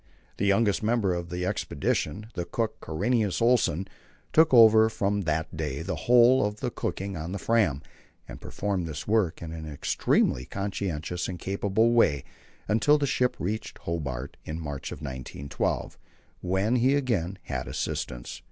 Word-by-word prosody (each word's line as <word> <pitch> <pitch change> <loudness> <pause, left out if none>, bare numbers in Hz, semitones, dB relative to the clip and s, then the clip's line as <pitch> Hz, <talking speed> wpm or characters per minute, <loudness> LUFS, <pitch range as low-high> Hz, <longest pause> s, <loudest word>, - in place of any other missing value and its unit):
The 100 - 0
youngest 100 0 +3
member 110 -4 +1
of 85 -1 -4
the 90 +1 -3
expedition 100 +7 -1
the 90 - -3
cook 110 +5 -3
Karinius 105 +5 0
Olsen 115 -7 +2 0.5
took 160 0 +5
over 110 -2 +7
from 100 -1 0
that 80 +1 -2
day 75 -1 -3
the 90 - -3
whole 125 +2 +6
of 105 +1 -2
the - - -2
cooking 100 0 -4
on 80 +3 -5
the - - -2
Fram, 100 - +1 0.4
and - - -10
performed 95 -4 -2
this 75 -3 -6
work 105 -7 +1
in 80 - -6
an 80 -1 -7
extremely 65 -3 +1
conscientious 90 -3 -3
and 90 - -5
capable 100 +5 +1
way 95 -12 +3 0.4
until 115 +8 +4
the 145 - 0
ship 125 -2 +1
reached 105 +5 -4
Hobart 70 -6 -4
in 80 +1 -5
March, 75 -4 -5
1912, 70 0 -4 0.4
when 95 +7 +1
he 130 +4 +3
again 100 -10 -1
had 65 -4 -4
assistance. - - -4
95 Hz, 150 wpm, -27 LUFS, 80-110 Hz, 0.5 s, over